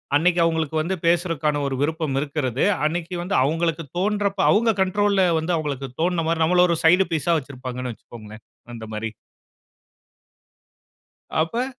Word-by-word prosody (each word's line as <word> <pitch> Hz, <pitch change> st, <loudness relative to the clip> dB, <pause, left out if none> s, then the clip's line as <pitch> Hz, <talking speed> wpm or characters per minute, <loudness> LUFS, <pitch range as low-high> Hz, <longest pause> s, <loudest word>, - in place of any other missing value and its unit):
அன்னைக்கு 175 Hz, +4 st, +3 dB
அவங்களுக்கு 160 Hz, -2 st, 0 dB
வந்து 185 Hz, +4 st, -2 dB
பேசுருதற்கான 165 Hz, -4 st, +1 dB
ஒரு 135 Hz, -, -2 dB
விருப்பம் 155 Hz, -2 st, -1 dB
இருக்குறது. 140 Hz, -3 st, -2 dB, 0.2 s
அன்னைக்கு 170 Hz, +3 st, -2 dB
வந்து 180 Hz, +3 st, -2 dB
அவங்களுக்கு 165 Hz, +2 st, 0 dB, 0.2 s
தோன்றப்ப 205 Hz, 0 st, 0 dB
அவங்க 225 Hz, +1 st, +3 dB
கண்ட்ரோல்ல 200 Hz, +1 st, +2 dB, 0.2 s
வந்து, 165 Hz, +3 st, -2 dB
அவங்களுக்கு 140 Hz, -4 st, -4 dB
தோன்ன 170 Hz, -1 st, 0 dB
மாரி 165 Hz, -1 st, +1 dB
நம்மள 180 Hz, +2 st, +4 dB
ஒரு 170 Hz, -, +1 dB
சைடு 180 Hz, +4 st, +5 dB
பீஸ்ஸா 165 Hz, +2 st, +1 dB
வச்சிருப்பாங்கன்னு 130 Hz, -3 st, -6 dB
வச்சுக்கோங்களேன். 110 Hz, -1 st, -13 dB, 0.3 s
அந்த 115 Hz, -1 st, -8 dB
மாரி. 110 Hz, 0 st, -4 dB, 2.3 s
அப்ப 230 Hz, +10 st, -1 dB
160 Hz, 130 wpm, -23 LUFS, 140-180 Hz, 2.3 s, சைடு